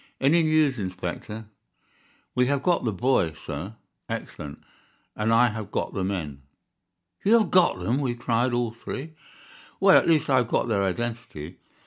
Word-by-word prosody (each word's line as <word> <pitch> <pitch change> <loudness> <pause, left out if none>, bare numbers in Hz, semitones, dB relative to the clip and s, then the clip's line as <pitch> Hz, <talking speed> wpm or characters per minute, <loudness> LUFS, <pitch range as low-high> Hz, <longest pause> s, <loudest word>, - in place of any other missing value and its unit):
"Any 150 +6 +4
news, 155 -5 +2
Inspector?" 95 +3 -5 0.9
"We 125 0 +2
have 140 0 0
got 175 -7 +2
the 110 - +1
boy, 100 -6 +1
sir." 80 +6 -7 0.3
"Excellent, 75 -1 -6 0.5
and 110 +1 0
I 120 +2 +5
have 105 -2 -6
got - - -2
the 95 - -2
men." 80 -8 -3 0.8
"You 225 +4 +6
have 220 - +1
got 180 - +4
them!" 115 +9 -1
we 130 -4 -1
cried, 120 +1 0
all 120 -1 0
three. 135 +6 -7 0.7
"Well, - - +7
at - - -2
least 160 -3 +3
I 130 - +3
have 125 -3 +2
got - - 0
their 105 -4 +1
identity. 110 -5 -4
115 Hz, 160 wpm, -25 LUFS, 95-135 Hz, 0.9 s, Well